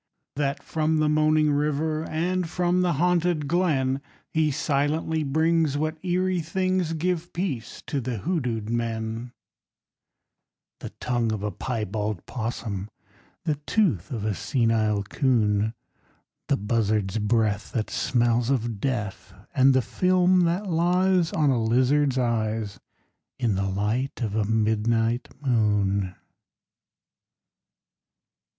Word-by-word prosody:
That 140 -1 -1
from 160 0 0
the 155 0 +2
moaning 155 0 +3
river 150 +2 0
And 175 +2 -1
from 180 +1 +1
the 180 -1 +2
haunted 175 -1 +1
glen 140 -6 +1 0.3
He 155 -1 +2
silently 150 +3 0
brings 160 0 +2
what 155 +2 -3
eerie 185 0 +1
things 185 0 0
Give 175 +1 -1
peace 165 - -4
to 140 - -2
hoodooed 125 - -2
men: 115 0 -3 1.5
_The - - -6
tongue 120 -2 0
of 105 -2 -3
a 105 - -1
piebald 105 -5 -3
'possum, 110 -4 -4 0.6
The 155 -3 0
tooth 150 - +1
of 110 -5 -4
a 110 - +1
senile 110 -3 +1
'coon, 110 -2 +1 0.7
The - - +2
buzzard's 105 -1 0
breath 105 -1 0
that 110 -3 -2
smells 120 -1 +1
of 120 -5 -1
death, 110 -8 -3 0.2
And 135 +1 +5
the 130 - +3
film 185 +2 +3
that 175 +5 0
lies 180 0 +2
On 150 -3 +2
a 120 -3 +1
lizard's 130 +4 +2
eyes 110 -4 -1 0.6
In 120 -5 +1
the 95 0 -1
light 105 +8 -1
of 105 -3 -2
a 110 -2 +1
midnight 110 +2 +1
moon! 105 -7 +1
130 Hz, 120 wpm, -25 LUFS, 110-160 Hz, 1.5 s, And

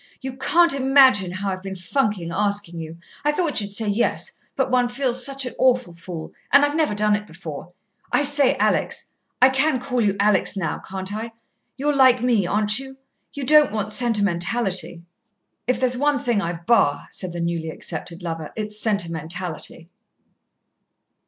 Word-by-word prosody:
"You 265 -1 -6
can't 335 +5 +3
imagine 260 -8 +4
how 190 +2 -3
I've 185 0 -5
been 190 0 -6
funking 185 -1 -1
asking 200 -2 -1
you 160 0 -8 0.3
I 295 - +3
thought 300 -5 +1
you'd 200 0 -6
say 220 +1 0
yes, 205 +3 0 0.2
but 265 -1 0
one 250 -1 +2
feels 255 0 -1
such 275 0 -1
an 250 - -5
awful 250 -7 +2
fool 170 -1 -8 0.2
and 280 +1 +7
I've 290 +1 -2
never 310 -9 +1
done 210 0 +2
it 210 0 -5
before. 160 -1 -9 0.4
I 290 - +3
say, 285 -2 +4
Alex - - -1 0.3
I 260 - +8
can 265 +1 +1
call 250 -1 -2
you 205 -3 +1
Alex 200 -1 +3
now, 185 - -2
can't 190 +1 -5
I 225 +2 -5 0.4
you're 290 +2 0
like 260 -2 +5
me, 230 -7 +2
aren't 210 +3 +3
you? 265 0 -9 0.4
You 285 - -4
don't 300 +1 +6
want 210 -1 -3
sentimentality. 195 -5 0 0.6
If 250 -1 +1
there's 255 -1 +2
one 290 +2 +2
thing 240 -5 0
I 170 -2 -2
bar," 170 -3 +1
said 185 - -5
the 170 - -6
newly 170 -1 -2
accepted 170 +2 -7
lover, 165 -2 -5
"it's 210 -1 -3
sentimentality." 170 -4 -2
210 Hz, 170 wpm, -22 LUFS, 180-260 Hz, 0.6 s, I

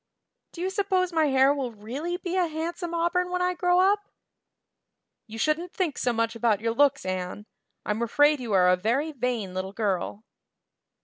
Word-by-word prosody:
Do 340 - -7
you 375 +1 -1
suppose 380 -3 0
my 320 -2 +3
hair 270 0 +4
will 270 -4 -3
really 260 +12 -5
be 360 0 -4
a 365 -2 +2
handsome 330 +2 -4
auburn 350 +2 +1
when 360 0 -1
I 360 0 +1
grow 355 0 +2
up?" 395 +3 +4 1.3
"You 225 0 -9
shouldn't 310 +8 0
think 340 -8 -1
so 245 - +1
much 230 0 -1
about 225 -3 +1
your 225 +1 -1
looks, 280 -2 +2
Anne. 185 +2 -4 0.4
I'm 210 +2 -1
afraid 290 +5 +3
you 240 -3 -5
are 180 -1 +5
a 180 - +5
very 240 +12 0
vain 245 -8 -2
little 185 +1 -4
girl." 205 -1 -2
280 Hz, 180 wpm, -26 LUFS, 220-350 Hz, 1.3 s, are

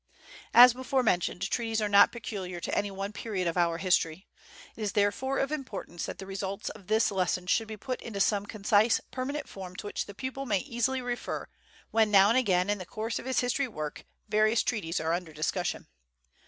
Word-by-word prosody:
As 245 0 +10
before 260 +1 0
mentioned, 180 -3 0
treaties 225 +2 -1
are 210 - 0
not 200 0 +6
peculiar 190 -6 -5
to - - -3
any 205 - 0
one 195 +1 -5
period 205 -5 -3
of 170 - -1
our 170 -2 +2
history. 175 -1 +1 0.5
It - - -10
is, 210 -2 -1
therefore, 210 +7 +1
of 270 +1 0
importance 255 - -5
that - - -6
the 195 - -8
results 195 0 -4
of 190 - -12
the 220 +2 +3
lesson 180 -1 0
should 220 +5 +1
be 215 0 -7
put 255 +4 -4
into 215 -4 -6
some 205 0 +2
concise, 215 +2 +3
permanent 280 +3 -3
form 185 -2 -9
to 205 - -7
which 205 - -3
the 205 - -10
pupil 265 +3 -5
may 200 -4 +1
easily 255 0 -1
refer 245 0 -4 0.4
when, 220 -1 +3
now 200 -1 +6
and 230 - +4
again 185 -6 +2
in 205 0 0
the 185 - -6
course 225 +2 -3
of - - -8
his 260 - +2
history 255 +2 0
work, 155 -10 -6 0.2
various 215 +2 +3
treaties 180 -8 -1
are 160 +1 0
under 170 -2 -3
discussion. 155 +4 -2
205 Hz, 205 wpm, -29 LUFS, 185-240 Hz, 0.5 s, As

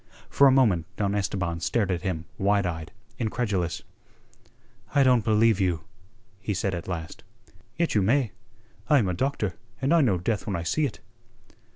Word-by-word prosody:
For 140 - +6
a - - +6
moment 110 -11 +3
Don 100 -1 0
Esteban 95 -4 -1
stared 100 +2 0
at 90 - -1
him 90 -4 -3
wide 100 0 +2
eyed, 80 -2 -4 0.3
incredulous. 105 -7 -1 1.1
"I 140 - +6
don't 125 -4 +4
believe 110 -1 +3
you," 90 -4 +1 0.6
he 105 +1 -3
said 95 +1 -1
at 85 -1 -5
last. 85 -3 -6 0.5
"Yet 170 0 +1
you 105 - +3
may. 120 +3 +2 0.6
I 150 - +6
am 110 -8 +2
a 90 - 0
doctor, 105 -2 -1 0.3
and 135 +4 +1
I 170 - +5
know 110 -10 +3
death 105 +5 -2
when 100 - -1
I 85 - -3
see 150 - +1
it." 120 - -11
100 Hz, 175 wpm, -26 LUFS, 90-120 Hz, 1.1 s, For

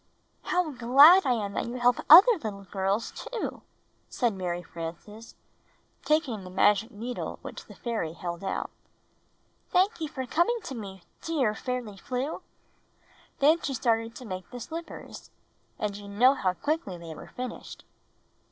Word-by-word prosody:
"How 360 -3 0
glad 280 +9 +7
I 255 - +4
am 205 -4 -3
that - - -2
you 240 - -5
help 245 0 +3
other 370 +11 +11
little 215 - -5
girls, 195 +3 -1
too," 485 - -5 0.5
said 240 -4 0
Mary 175 -2 -3
Frances, 175 +7 -9 0.7
taking 300 - 0
the 185 - -9
magic 205 +4 +3
needle 240 +2 -5
which - - -8
the - - -14
fairy 220 -10 -3
held 170 +1 -6
out. 195 - -3 1.0
"Thank 375 +1 +2
you 315 - -1
for 265 -4 -5
coming 345 - +1
to - - -6
me, 195 -6 -8 0.2
dear 280 -10 0
Fairly 240 -3 -4
Flew!" 255 +8 -4 1.0
Then 310 +4 +4
she 275 - -2
started 230 -2 0
to 255 - -9
make 185 -4 -6
the 245 - -8
slippers 330 +7 -8 0.3
— - - -41
and 210 -1 -2
you 205 0 -9
know 235 +7 +4
how 190 -9 0
quickly 290 - -2
they 165 -1 -9
were - - -11
finished. 250 -1 -7
235 Hz, 155 wpm, -28 LUFS, 200-280 Hz, 1.0 s, other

